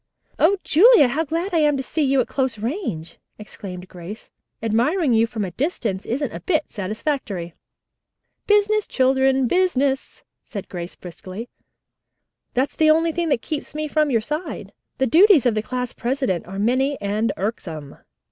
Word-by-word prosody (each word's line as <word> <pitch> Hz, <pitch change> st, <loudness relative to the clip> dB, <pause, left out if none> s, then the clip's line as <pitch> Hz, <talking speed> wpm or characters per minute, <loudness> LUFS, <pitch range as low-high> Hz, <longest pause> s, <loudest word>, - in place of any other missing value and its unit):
"O 400 Hz, -, +4 dB
Julia, 390 Hz, -, +6 dB
how 295 Hz, +6 st, 0 dB
glad 335 Hz, +5 st, -3 dB
I 335 Hz, -, +3 dB
am 295 Hz, -2 st, +3 dB
to 265 Hz, -, -3 dB
see 310 Hz, +4 st, -2 dB
you 270 Hz, -2 st, +3 dB
at -, -, -3 dB
close 260 Hz, -4 st, -1 dB
range!" 220 Hz, -, -4 dB, 0.2 s
exclaimed 185 Hz, -3 st, -9 dB
Grace. 180 Hz, +4 st, -10 dB, 0.3 s
"Admiring 250 Hz, -, +2 dB
you 225 Hz, 0 st, +4 dB
from 220 Hz, -3 st, -3 dB
a 180 Hz, -, -6 dB
distance 225 Hz, -, -2 dB
isn't 270 Hz, +3 st, -1 dB
a -, -, -5 dB
bit 320 Hz, -5 st, -1 dB
satisfactory." 205 Hz, -, -3 dB, 0.9 s
"Business, 415 Hz, 0 st, +3 dB
children, 265 Hz, 0 st, +2 dB
business," 280 Hz, -6 st, 0 dB, 0.2 s
said 200 Hz, -4 st, -7 dB
Julia 175 Hz, -2 st, -4 dB
briskly. 185 Hz, +6 st, -8 dB, 1.1 s
"That's 260 Hz, +3 st, 0 dB
the 310 Hz, -1 st, +4 dB
only 325 Hz, +1 st, +4 dB
thing 335 Hz, 0 st, -1 dB
that 240 Hz, -, +1 dB
keeps 305 Hz, -1 st, -5 dB
me 305 Hz, 0 st, -2 dB
from 305 Hz, 0 st, +1 dB
your 230 Hz, -4 st, +2 dB
side. 300 Hz, +9 st, -5 dB, 0.2 s
The 265 Hz, -, +2 dB
duties 335 Hz, -, +6 dB
of 245 Hz, -, +3 dB
the 215 Hz, -, 0 dB
class 250 Hz, +2 st, -4 dB
president 245 Hz, -9 st, -2 dB
are 190 Hz, +1 st, -7 dB
many 260 Hz, +7 st, +1 dB
and 210 Hz, +3 st, 0 dB
irksome. 165 Hz, -8 st, -5 dB
260 Hz, 160 wpm, -22 LUFS, 215-310 Hz, 1.1 s, Julia